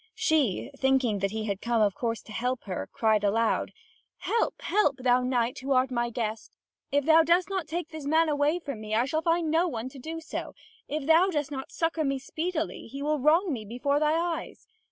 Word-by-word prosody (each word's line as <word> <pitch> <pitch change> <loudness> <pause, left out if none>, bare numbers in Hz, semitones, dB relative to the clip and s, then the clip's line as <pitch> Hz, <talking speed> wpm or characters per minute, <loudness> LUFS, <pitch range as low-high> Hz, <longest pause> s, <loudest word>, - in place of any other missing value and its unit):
She, 310 - +1
thinking 265 -6 +2
that 195 +1 0
he 220 +2 -4
had 200 -2 -3
come 235 -1 +1
of 205 -2 +3
course 230 +1 -3
to - - -13
help 250 +3 -2
her, 185 -3 -5
cried 220 -2 +2
aloud: 225 +3 +1 0.5
"Help, 460 - -1
help, 385 -9 +2
thou 250 -1 +3
knight, 250 -1 0
who 270 +2 -1
art 255 0 +2
my 240 -1 0
guest. 225 -2 -4 0.4
If 285 -1 +1
thou 320 +1 +7
dost 345 +4 +2
not 375 -5 -2
take 330 +1 -4
this 315 -3 -7
man 320 +2 +3
away 295 +2 +2
from 280 -10 -6
me, 215 0 -3
I 235 +3 +3
shall 315 +4 -1
find 330 -1 +1
no 335 +3 +3
one 245 -5 -4
to 270 - -12
do 325 +5 -6
so; 325 - -6 0.3
if 300 -1 -3
thou 330 +5 +5
dost 295 -5 -2
not 265 -2 -6
succour 330 -1 -1
me 275 -1 0
speedily, 320 +4 -4
he 275 +4 -6
will 300 0 0
wrong 320 +5 +3
me 225 -4 -4
before 250 +7 -1
thy 305 0 +2
eyes. 340 -1 -4
275 Hz, 215 wpm, -28 LUFS, 235-320 Hz, 0.5 s, thou